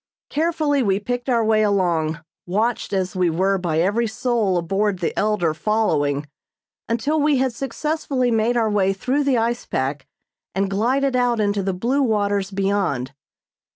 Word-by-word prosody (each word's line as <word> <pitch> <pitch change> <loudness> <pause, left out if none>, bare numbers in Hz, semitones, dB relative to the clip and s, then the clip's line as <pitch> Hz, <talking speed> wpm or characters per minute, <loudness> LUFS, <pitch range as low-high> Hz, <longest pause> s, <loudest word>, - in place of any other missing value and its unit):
Carefully 310 -2 +1
we 200 -4 +1
picked 245 +4 -3
our 230 -3 +2
way 215 0 +3
along, 170 -6 +1 0.3
watched 220 +6 -1
as 190 -2 -1
we 180 -2 +2
were 190 +4 +1
by 170 -3 -1
every 205 +8 +1
soul 220 -4 0
aboard 195 +3 0
the 175 - -2
"Elder" 205 -7 +1
following, 155 -7 0 0.6
until 280 +7 0
we 295 -1 +3
had 260 -1 0
successfully 275 -1 -1
made 230 +2 +2
our 220 -2 +1
way 195 -2 +2
through 260 +9 0
the 275 -3 +2
ice 235 +1 -1
pack 135 +1 -2 0.5
and 195 0 0
glided 255 +6 +1
out 245 -2 +2
into 205 -1 +1
the 195 0 -1
blue 245 +9 0
waters 205 -5 +1
beyond. 195 -10 -1
210 Hz, 155 wpm, -21 LUFS, 190-245 Hz, 0.6 s, way